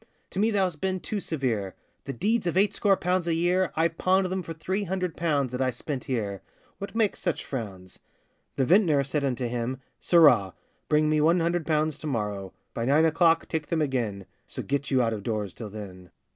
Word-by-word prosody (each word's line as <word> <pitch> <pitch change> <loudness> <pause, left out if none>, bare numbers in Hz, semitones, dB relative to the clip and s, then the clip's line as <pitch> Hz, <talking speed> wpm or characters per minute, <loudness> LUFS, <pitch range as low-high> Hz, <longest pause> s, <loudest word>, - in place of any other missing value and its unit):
'To 190 - -4
me 215 +2 +3
thou 205 -3 +2
hast 175 -5 -3
been 190 -1 -1
too 210 +3 -3
severe; 120 - -2 0.3
The 140 - -3
deeds 205 - 0
of 175 - -1
eightscore 200 0 +3
pounds 180 -1 0
a 165 - +2
year, 175 +1 +2
I 160 +1 +3
pawned 185 +3 +1
them 190 0 -1
for 165 - -8
three 185 +5 -2
hundred 180 -2 -2
pounds, 145 -6 0
That 125 +1 -3
I 130 - +2
spent 130 +2 -5
here;—what 120 - -6
makes 220 -3 +1
such 175 -4 -2
frowns?' 95 -8 -6 0.6
The 135 - +1
vintner 165 -4 +4
said 140 +2 -2
unto 130 -2 -1
him, 120 +2 -3 0.2
'Sirrah! 125 - +5 0.3
Bring 150 0 +3
me 155 0 +2
one 165 +3 +4
hundred 170 -1 0
pounds 155 -1 +1
to 155 - -6
morrow 105 -7 -3 0.2
By 115 - -2
nine 145 +5 +4
o'clock,—take 160 -1 +2
them 160 -2 +1
again; 115 -8 -2 0.2
So - - -5
get 140 +1 -2
you 130 -2 +3
out 115 -1 0
of 105 - -4
doors 105 -3 -3
till 110 -3 -7
then. 95 -4 -9
150 Hz, 200 wpm, -27 LUFS, 120-175 Hz, 0.6 s, Sirrah